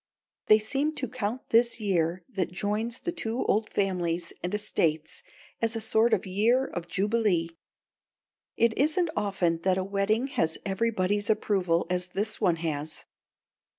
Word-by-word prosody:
They 215 - +8
seem 280 +8 -1
to 260 - -1
count 245 0 -4
this 235 +1 +3
year 180 -4 0
that 185 -4 -2
joins 210 +6 -2
the 345 - -2
two 235 -7 -3
old 215 +2 +1
families 175 -3 -1
and 180 - -3
estates 165 -7 -1 0.4
as 230 0 0
a - - -1
sort 220 +1 +2
of - - +1
year 225 +8 +2
of 175 -7 -6
jubilee. 195 -4 +1 1.1
It 230 -1 +3
isn't 315 +4 +2
often 180 -5 0
that 185 +1 +2
a 190 - 0
wedding 200 +5 0
has 165 - -1
everybody's 205 0 0
approval 190 -6 +1
as 180 0 -1
this 205 +5 -3
one 180 -5 +3
has. 155 0 -4
205 Hz, 150 wpm, -28 LUFS, 180-230 Hz, 1.1 s, They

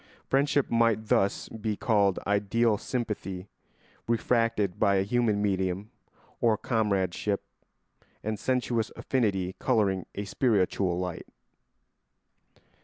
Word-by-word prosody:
Friendship 140 +1 +1
might 115 -2 +2
thus 100 - +2
be 110 -2 -4
called 100 -6 +2
ideal 105 +2 +2
sympathy 105 -6 -4 0.6
refracted 115 -4 +1
by 100 - +4
a 95 - +3
human 110 -1 +1
medium, 95 +1 -1 0.5
or 115 -2 +3
comradeship 100 -3 0 0.8
and 110 -1 -2
sensuous 125 -3 0
affinity 95 -8 0
colouring 95 -4 +1
a 100 - -3
spiritual 100 -5 +1
light. 90 -2 -4
105 Hz, 100 wpm, -28 LUFS, 95-115 Hz, 0.8 s, by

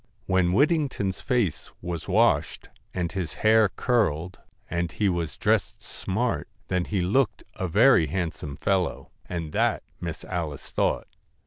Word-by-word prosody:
When 95 -2 +2
Whittington's 135 - +1
face 120 - 0
was 85 -2 -5
washed, - - +2 0.2
and 85 -2 -2
his 90 -2 -3
hair 110 -1 +6
curled, 90 - 0 0.3
and 85 0 -2
he 105 - 0
was 85 -3 -2
dressed - - 0
smart, 115 +6 -2 0.2
then 90 -1 +1
he 100 -3 -1
looked 105 +4 +1
a 95 - -3
very 100 - +5
handsome 80 -4 -3
fellow, 95 -4 -1 0.2
and 85 -3 -4
that - - +1 0.2
Miss 85 -2 -5
Alice 80 -6 -4
thought. - - 0
95 Hz, 135 wpm, -26 LUFS, 85-110 Hz, 0.3 s, hair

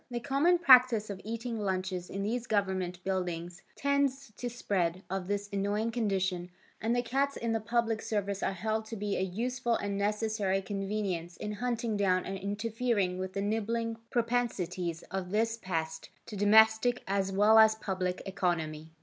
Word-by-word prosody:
The 240 -1 -3
common 285 +8 +3
practice 250 -9 +6
of 195 -1 -7
eating 230 +1 -4
lunches 185 -2 -2
in 195 +1 -3
these 235 +3 -2
government 185 -4 -1
buildings 175 -2 -3
tends 275 -3 0
to 245 - -3
the - - -11
spread 185 -5 -1
of 190 -1 -2
this 205 0 -2
annoying 205 +3 0
condition 190 -6 -1 0.3
and 230 +2 +1
the 245 - +1
cats 275 +3 0
in 230 -1 -2
the 225 - +1
public 225 0 0
service 200 -3 -2
are - - +1
held 220 +4 -2
to 225 +1 -6
be 205 -1 -2
a - - -1
useful 235 +6 -1
and 200 -2 -2
necessary 210 -1 0
convenience 195 -3 -3
in 210 - -4
hunting 235 0 -2
down 185 -2 +2
and 195 0 -4
interfering 205 -1 -1
with 185 0 -4
the 200 - -2
nibbling 225 +2 -1
propensities 185 -9 -1
of 190 -1 -3
this 225 +3 +1
pest 160 -5 -4 0.2
to 215 - -8
domestic 220 +4 +5
as 195 0 0
well 210 +3 +6
as 220 0 +7
public 185 -3 -3
economy. 165 -5 -2
205 Hz, 165 wpm, -30 LUFS, 190-230 Hz, 0.3 s, as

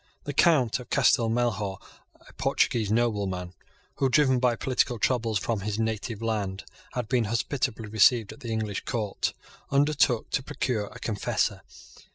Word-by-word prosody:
The 145 - -4
Count 135 -7 +3
of 125 - -11
Castel 120 -4 +3
Melhor, 110 -5 -1 0.5
a - - -16
Portuguese 110 -4 +1
nobleman, 100 -6 0 0.4
who, 135 - +2
driven 130 -2 +4
by 125 -1 +2
political 125 0 0
troubles 115 -1 +1
from 110 +2 -1
his 105 +1 -3
native 110 0 -2
land, 105 -4 -2 0.3
had 125 -3 -3
been 120 -2 +1
hospitably 115 +1 -1
received 110 +1 +4
at - - -16
the 120 - -7
English 110 -3 -2
court, 105 -4 -2 0.3
undertook 140 -4 +2
to - - +1
procure 120 -5 -2
a - - -11
confessor. 105 -3 -1
115 Hz, 150 wpm, -27 LUFS, 105-125 Hz, 0.5 s, driven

